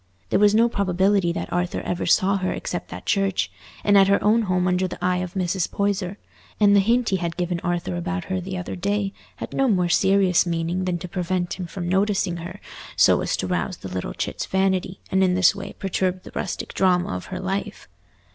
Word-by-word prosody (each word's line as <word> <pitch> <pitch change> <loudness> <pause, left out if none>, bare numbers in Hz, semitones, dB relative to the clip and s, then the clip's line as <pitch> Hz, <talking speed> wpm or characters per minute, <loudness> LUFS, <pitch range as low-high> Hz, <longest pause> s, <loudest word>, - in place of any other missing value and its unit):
There - - +3
was 205 0 +5
no 230 +2 +5
probability 195 -3 +1
that - - -5
Arthur 175 0 -1
ever 175 0 -3
saw 195 +3 +3
her 185 -1 -1
except - - -5
at - - -8
church, 195 -2 +1 0.3
and 205 - +4
at 195 -1 +7
her 200 0 +4
own 220 +3 +4
home 185 -3 +1
under 180 +1 +1
the - - -7
eye 180 0 +1
of 180 +1 -4
Mrs. 185 -1 0
Poyser; 200 -1 -1 0.4
and 205 -1 +5
the - - +7
hint 230 +4 +2
he 190 - +1
had 170 -2 -4
given 175 -1 -1
Arthur 175 0 -2
about 180 +1 -3
her 185 +1 -3
the 185 +1 -5
other 180 - -5
day 200 +1 -1 0.2
had - - -7
no 270 - +2
more 180 -6 +2
serious 190 0 +4
meaning 170 +1 -2
than 180 -1 0
to 175 - -7
prevent 180 0 -2
him 180 - -4
from 175 0 -5
noticing 190 -1 +1
her 175 +4 -8 0.4
so - - +5
as - - -1
to - - -2
rouse 180 0 -2
the 95 - -8
little 90 -10 -4
chit's - - -3
vanity, 190 -1 0
and 190 0 +3
in 180 -1 +3
this 185 -2 +5
way - - -7
perturb 185 -1 -1
the - - -11
rustic 175 - -4
drama 180 - +2
of 90 - -6
her 185 - -6
life. 195 +2 -4
185 Hz, 215 wpm, -23 LUFS, 175-195 Hz, 0.4 s, at